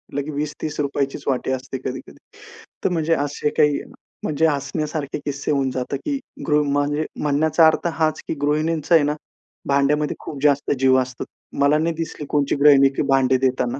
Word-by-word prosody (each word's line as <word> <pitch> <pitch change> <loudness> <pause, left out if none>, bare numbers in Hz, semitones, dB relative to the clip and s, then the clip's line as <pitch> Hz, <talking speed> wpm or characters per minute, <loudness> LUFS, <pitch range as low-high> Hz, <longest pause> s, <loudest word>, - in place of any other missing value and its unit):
लगेच 145 +1 -3
₹20-₹30चीच 145 -2 -3
वाटी 130 -1 0
असते. 130 0 -4
कधी-कधी 130 - -6 0.7
तर, - - +2
म्हणजे 165 -2 +1
असे 145 +1 -2
काही, 150 -1 +3 0.4
म्हणजे 160 +2 +2
हसण्यासारखे 150 0 -2
किस्से 140 0 -2
होऊन 135 -2 +1
जातं. 130 +2 -3
की 280 -2 -1 0.3
गृ 150 -1 +3 0.2
म्हणजे 145 +2 0 0.2
म्हणण्याचा 155 +2 +4
अर्थ 160 +2 +1
हाच 155 -1 +1
की - - -1
गृहिणींचा 155 +2 0
आहे 160 - +5
ना, 145 +1 0 0.6
भांड्यामध्ये 145 +2 +2
खूप 140 -3 -7
जास्त 145 -1 +2
जीव 130 0 +4
असतो. 130 0 -5 0.4
मला 140 +2 +4
नाही 160 +1 0
दिसली 160 -2 -5
कोणची 145 -1 +1
गृहिणी, 140 -2 +7
की 135 - -3
भांडे 130 -1 +4
देताना. 130 -1 0
145 Hz, 160 wpm, -21 LUFS, 135-155 Hz, 0.7 s, गृहिणी